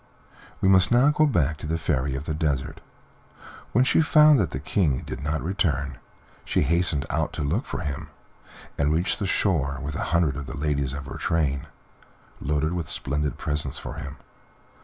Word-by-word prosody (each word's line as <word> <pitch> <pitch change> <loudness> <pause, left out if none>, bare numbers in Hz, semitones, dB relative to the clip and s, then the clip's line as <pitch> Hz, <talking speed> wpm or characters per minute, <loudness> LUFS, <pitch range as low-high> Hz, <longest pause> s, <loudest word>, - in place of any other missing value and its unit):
We - - +3
must 95 +1 +5
now 125 +4 +5
go 155 +1 +3
back 80 - +1
to 75 - -7
the 80 +1 0
Fairy 70 -4 -1
of 70 +2 -5
the 80 - -2
Desert. 75 -4 -2 0.9
When 125 - +4
she 135 - +3
found 150 -2 +6
that 90 - +1
the 65 - -5
King 75 -3 0
did - - -6
not 80 +1 -1
return, 70 -7 -1 0.4
she - - +1
hastened 80 -2 +1
out - - -1
to - - -3
look 85 - 0
for - - -4
him, 75 -4 -4 0.7
and 70 +1 +2
reached 85 +4 +1
the 100 - -1
shore, 75 -8 +1
with 70 +2 -5
a - - -2
hundred 80 -4 +1
of 70 -2 -6
the 70 - -6
ladies 70 -2 -1
of 75 0 -6
her - - -7
train, 75 -5 0 0.7
loaded 75 +3 0
with 85 -3 -3
splendid 75 +2 -2
presents 75 -2 -2
for - - -7
him. 70 -1 -7
75 Hz, 185 wpm, -25 LUFS, 70-90 Hz, 0.9 s, found